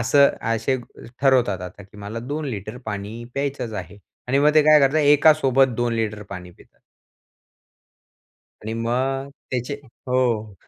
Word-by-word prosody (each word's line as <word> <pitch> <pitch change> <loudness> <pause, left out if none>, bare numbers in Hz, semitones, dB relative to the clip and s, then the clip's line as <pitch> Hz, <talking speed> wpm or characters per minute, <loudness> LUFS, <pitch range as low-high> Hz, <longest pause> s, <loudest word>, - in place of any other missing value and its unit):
असं 140 +4 +5 0.3
असे 115 +4 0 0.4
ठरवतात 125 -8 +3
आता 90 +3 -9
की 100 +2 -18
मला 105 +3 -6
2 145 +6 -4
लिटर 110 -3 -5
पाणी 105 +2 -5
प्यायचंच 140 -4 -3
आहे 100 0 -7 0.3
आणि 135 +2 +2
मग 150 +2 +4
ते 155 - +7
काय 155 0 +6
करतात 140 +3 +3
एकासोबत 145 -3 +4
2 120 -1 0
लिटर 110 -2 -2
पाणी 90 -2 -8
पितात. - - -22 1.8
आणि 110 - -4
मग 130 +4 -1 0.2
त्याचे 125 +2 -2 0.3
हो. 120 -5 0
120 Hz, 140 wpm, -22 LUFS, 110-140 Hz, 1.8 s, ते